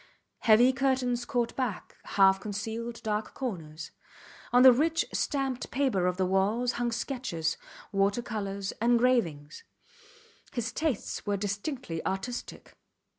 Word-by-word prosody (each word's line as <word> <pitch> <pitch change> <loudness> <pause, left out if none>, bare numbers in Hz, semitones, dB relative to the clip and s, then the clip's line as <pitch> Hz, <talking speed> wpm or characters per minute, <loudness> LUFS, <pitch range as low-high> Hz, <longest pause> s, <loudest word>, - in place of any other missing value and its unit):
Heavy 240 +3 +5
curtains 255 -2 0
caught 245 -4 -1
back, 250 -8 -3 0.2
half 195 -1 +6
concealed 225 +3 -5
dark 215 0 -2
corners. 165 - -5 0.6
On 245 +1 +6
the 260 - +11
rich, 320 +6 +1
stamped 270 -4 -1
paper 250 -10 +1
of 180 0 -1
the 190 - +1
walls 205 +6 +1
hung 240 -1 0
sketches, 225 - -2 0.4
water 200 +3 +1
colours, 200 -3 -4
engravings. 235 - +1 0.9
His 230 -3 -2
tastes 295 -8 -2
were 205 -1 +1
distinctly 205 - -4
artistic. 195 +6 -5
230 Hz, 120 wpm, -29 LUFS, 195-250 Hz, 0.9 s, the